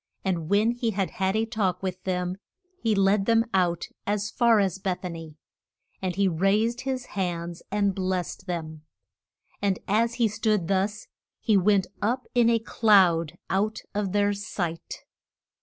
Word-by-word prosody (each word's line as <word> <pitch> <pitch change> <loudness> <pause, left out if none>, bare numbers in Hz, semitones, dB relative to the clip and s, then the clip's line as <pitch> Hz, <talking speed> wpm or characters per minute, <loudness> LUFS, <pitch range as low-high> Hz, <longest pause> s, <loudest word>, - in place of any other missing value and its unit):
And 170 -4 -1
when 210 +3 +3
he 240 -1 -1
had 195 -3 -1
had 190 -3 -1
a 220 +1 +2
talk 195 -5 -1
with 185 -1 -4
them 180 0 -1 0.4
he 225 -2 +1
led 195 0 +3
them 230 0 +4
out 175 -3 +1 0.2
as 205 0 -1
far 235 -3 +4
as 195 -2 0
Beth 190 -1 -2
a 180 - -3
ny. 165 -2 -9 0.7
And 185 -2 -2
he 200 0 +2
raised 205 +8 +1
his 260 -2 -3
hands 175 -3 -3
and 200 -1 +1
blest 185 0 -3
them, 160 -3 -4 0.8
and 195 -2 +1
as 230 +3 +2
he 235 -3 +3
stood 215 -4 0
thus 200 +2 0 0.3
he 220 - +2
went 195 0 +4 0.2
up 245 +5 0
in 240 -1 +4
a 230 - +4
cloud 190 -8 +3
out 210 +3 -1
of 200 -2 -1
their 205 0 +2
sight. 180 -5 -5
195 Hz, 160 wpm, -26 LUFS, 180-215 Hz, 0.8 s, them